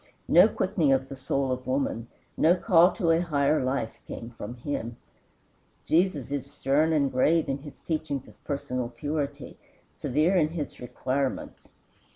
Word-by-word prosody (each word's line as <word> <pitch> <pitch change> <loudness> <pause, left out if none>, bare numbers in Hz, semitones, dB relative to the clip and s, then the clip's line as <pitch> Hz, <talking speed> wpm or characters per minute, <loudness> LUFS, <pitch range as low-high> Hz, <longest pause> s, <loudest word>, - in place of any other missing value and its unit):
No 180 +5 +7
quickening 185 -8 +1
of 135 0 +1
the 135 - -6
soul 135 0 -1
of 130 0 -4
woman, 130 -3 -1 0.3
no 165 +3 +4
call 180 -2 +5
to 170 -6 +1
a 165 - +4
higher 150 -4 +1
life, 130 -3 -2
came 115 +1 -7
from 115 0 -7
him. 120 -2 -4 0.9
Jesus 160 -6 +1
is 140 -1 -4
stern 145 +3 +2
and 145 -3 +2
grave 155 +6 +3
in 135 +1 -2
his 145 0 -12
teachings 155 -5 -3
of - - -19
personal 125 -4 -3
purity, 145 0 -4 0.3
severe 155 +8 +1
in 165 -4 +4
his 155 -2 -5
requirements. 130 +2 -3
140 Hz, 155 wpm, -27 LUFS, 130-160 Hz, 0.9 s, No